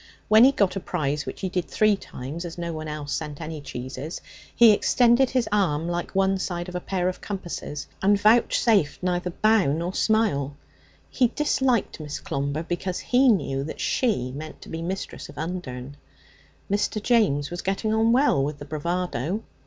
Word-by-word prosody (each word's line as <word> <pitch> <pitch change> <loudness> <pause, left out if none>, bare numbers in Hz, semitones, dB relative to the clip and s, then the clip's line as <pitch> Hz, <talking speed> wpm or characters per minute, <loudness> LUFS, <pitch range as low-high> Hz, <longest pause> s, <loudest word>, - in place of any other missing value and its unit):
When 215 +2 +8
he 270 - +6
got 200 -8 +1
a - - -1
prize, 145 -4 -2
which - - -6
he 190 - -1
did 180 -2 -1
three 215 -1 +3
times, 165 +1 -7
no 170 -1 -3
one 155 0 -5
else 150 -1 -3
having 150 -1 -6
sent - - -16
any 155 -1 -6
cheeses, 130 +3 -6 0.4
he 235 -2 +8
extended 245 +4 +4
his 255 -3 0
arm 170 -6 +1
like 175 +2 -3
one 195 0 +2
side 175 -1 -3
of 180 - -8
a 180 - -2
pair 180 0 -1
of 185 - -3
compasses, 175 -7 -5 0.2
and 200 +1 +4
vouchsafed 215 -6 +3
neither 180 0 0
bow 215 -3 +3
nor 170 +5 -2
smile. 185 -13 +1 0.5
He 250 - +3
disliked 260 - 0
Miss 150 -1 -5
Clomber 140 +3 -3
because 175 +2 -3
he 255 +2 +3
knew 140 - +1
that 155 - -7
she 200 - 0
meant 155 +2 -8
to - - -12
be 165 - -5
mistress 185 +3 -5
of - - -13
Undern. 145 -5 -5 0.7
Mr. 205 +1 0
James 205 - +2
was 175 - -4
getting 195 +3 -1
on 225 +1 +3
well 245 - +3
with 145 +1 -3
the 145 - -9
bravado. 170 - -2
180 Hz, 180 wpm, -25 LUFS, 150-215 Hz, 0.7 s, When